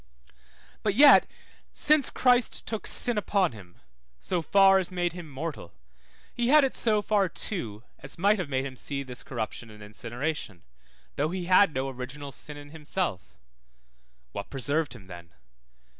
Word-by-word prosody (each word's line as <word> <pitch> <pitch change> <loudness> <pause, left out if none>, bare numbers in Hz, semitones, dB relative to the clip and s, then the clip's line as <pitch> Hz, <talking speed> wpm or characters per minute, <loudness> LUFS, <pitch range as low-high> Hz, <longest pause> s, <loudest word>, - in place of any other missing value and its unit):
But 205 -2 0
yet 285 +3 +8 0.4
since 300 -1 +3
Christ 250 -2 +2
took 220 -2 -4
sin 240 -4 +4
upon 195 -2 +1
him, 95 -6 -14 0.4
so 175 - -2
far 195 +4 +5
as 185 -1 -3
made 175 -2 -1
him 175 -3 -9
mortal, 140 - -7 0.6
he 240 -1 -1
had 300 +3 +6
it 270 - 0
so 215 -3 +1
far 205 -3 +1
too 115 - -3 0.2
as 135 - -7
might 200 +4 +3
have 175 -6 -4
made 130 -1 -1
him 135 -2 -7
see 140 +2 -4
this 125 -2 -8
corruption 115 -1 -6
and 105 -1 -13
incineration, 115 - -5 0.5
though 150 +2 0
he 180 0 -4
had 185 +1 +5
no 130 +1 -1
original 135 +2 -7
sin 150 +2 -8
in 145 0 -12
himself; 160 - -4 0.9
what 100 - -7
preserved 140 0 -1
him 105 -6 -13
then? 85 -2 -12
155 Hz, 160 wpm, -27 LUFS, 125-195 Hz, 0.9 s, yet